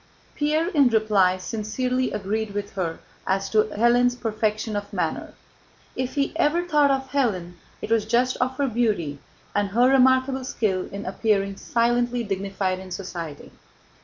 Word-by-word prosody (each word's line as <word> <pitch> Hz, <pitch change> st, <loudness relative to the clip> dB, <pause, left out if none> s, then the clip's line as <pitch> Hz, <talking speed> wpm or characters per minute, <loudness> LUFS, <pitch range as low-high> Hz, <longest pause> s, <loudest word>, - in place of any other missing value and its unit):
Pierre, 305 Hz, +3 st, +1 dB
in 285 Hz, -8 st, +4 dB
reply, 210 Hz, -5 st, +3 dB
sincerely 250 Hz, +6 st, -2 dB
agreed 210 Hz, +1 st, -3 dB
with 205 Hz, 0 st, -3 dB
her 175 Hz, -4 st, -2 dB, 0.3 s
as 195 Hz, +1 st, 0 dB
to 215 Hz, -1 st, +4 dB
Hélène's 240 Hz, +3 st, +3 dB
perfection 215 Hz, -2 st, -2 dB
of 205 Hz, 0 st, -4 dB
manner. -, -, -3 dB, 0.6 s
If 255 Hz, +2 st, -3 dB
he 280 Hz, -1 st, 0 dB
ever 340 Hz, +1 st, +2 dB
thought 295 Hz, -4 st, +4 dB
of 265 Hz, -1 st, -1 dB
Hélène, 205 Hz, -11 st, 0 dB, 0.3 s
it -, -, -5 dB
was 225 Hz, -2 st, +3 dB
just 245 Hz, +3 st, +2 dB
of 255 Hz, +1 st, -1 dB
her 280 Hz, -, +1 dB
beauty 210 Hz, -, 0 dB, 0.4 s
and 205 Hz, 0 st, +2 dB
her 240 Hz, +5 st, +4 dB
remarkable 260 Hz, 0 st, +3 dB
skill 200 Hz, -7 st, -1 dB
in 200 Hz, +1 st, -6 dB
appearing 200 Hz, 0 st, 0 dB
silently 240 Hz, +1 st, +1 dB
dignified 195 Hz, -2 st, -2 dB
in 190 Hz, 0 st, -10 dB
society. 175 Hz, -5 st, -7 dB
220 Hz, 150 wpm, -24 LUFS, 195-255 Hz, 0.6 s, in